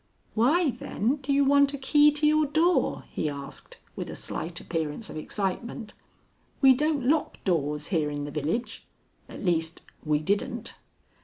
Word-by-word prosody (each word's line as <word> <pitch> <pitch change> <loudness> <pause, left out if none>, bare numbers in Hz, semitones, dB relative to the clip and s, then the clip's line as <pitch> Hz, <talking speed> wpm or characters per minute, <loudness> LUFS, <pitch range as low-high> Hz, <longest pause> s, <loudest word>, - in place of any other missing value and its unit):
"Why, 285 +8 +3
then, 240 +4 -1
do 280 0 -4
you 280 0 +4
want 280 0 +4
a - - -5
key 295 +2 +5
to 300 +1 +1
your 305 0 +4
door?" 325 +5 +2
he 155 - -1
asked, 140 -1 -8 0.2
with - - -5
a - - -6
slight 170 +1 -5
appearance 165 +5 -4
of - - -9
excitement. 210 - -4 0.7
"We 265 -2 +7
don't 295 0 0
lock 305 +2 +1
doors 150 -5 -1
here 160 -6 +1
in 145 0 -4
the 145 - -5
village; 160 - -3 0.5
at - - -8
least 165 -2 0 0.2
we 150 -1 +2
didn't." 220 - -2
225 Hz, 160 wpm, -27 LUFS, -, 0.7 s, We